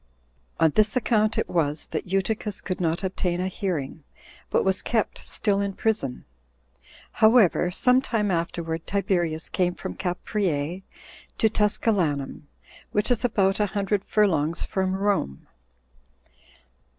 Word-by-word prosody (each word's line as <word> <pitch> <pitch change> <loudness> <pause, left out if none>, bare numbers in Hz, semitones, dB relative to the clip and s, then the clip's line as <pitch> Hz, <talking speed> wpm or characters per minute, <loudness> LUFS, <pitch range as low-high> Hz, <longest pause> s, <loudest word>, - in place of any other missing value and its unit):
On 160 -1 +4
this 215 - +2
account 220 -3 +2
it - - 0
was 150 -3 0
that - - -3
Eutychus 205 +2 -1
could 185 -1 -4
not 165 +2 0
obtain 180 -2 -1
a 185 +1 -2
bearing, 160 -6 -2 0.5
but - - +1
was 190 -1 +2
kept 225 -3 -1
still 200 -2 0
in 200 -1 -2
prison. 190 - -1 0.9
However, 220 -6 +4
some 250 +8 +3
time 210 -6 -1
afterward, 165 -1 -3
Tiberius 175 -5 0
came 180 -1 0
from - - -6
Capreae 180 -3 -2 0.6
to 220 - +3
Tusculanum, 180 -10 0 0.4
which 210 +4 0
is 245 - +1
about 200 -5 +2
a 210 - +2
hundred 200 0 0
furlongs 170 -8 +1
from 190 -2 -1
Rome. 195 - -1
190 Hz, 125 wpm, -25 LUFS, 170-210 Hz, 0.9 s, On